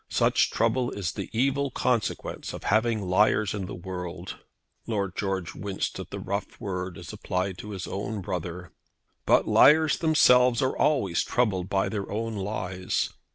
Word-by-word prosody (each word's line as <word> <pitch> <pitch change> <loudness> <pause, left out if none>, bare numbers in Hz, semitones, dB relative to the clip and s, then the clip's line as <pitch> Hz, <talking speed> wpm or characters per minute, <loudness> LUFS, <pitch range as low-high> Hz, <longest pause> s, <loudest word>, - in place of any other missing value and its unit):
Such - - +3
trouble 120 +2 +1
is 95 -4 -3
the - - -6
evil 140 +4 +1
consequence 125 -3 -2
of - - -8
having 110 0 +2
liars 100 +2 +2
in 100 -3 -4
the - - -6
world." 90 0 -6 0.5
Lord 100 -4 -2
George 95 -3 -2
winced 100 -1 -4
at - - -7
the - - -6
rough 100 +1 -4
word 90 -2 -4
as 85 -2 -9
applied 90 0 -2
by 100 - -2
inference 90 - -8
to 105 - -9
his 95 -3 -5
own 100 +1 -4
brother. 90 -1 -5 0.6
"But - - +4
liars 155 +2 +5
themselves 125 -7 +5
are 130 - +1
always 100 - +2
troubled 100 -7 0
by 95 0 +1
their 100 -3 -4
own 115 +1 -2
lies. 95 -2 -2
100 Hz, 165 wpm, -27 LUFS, 90-115 Hz, 0.6 s, liars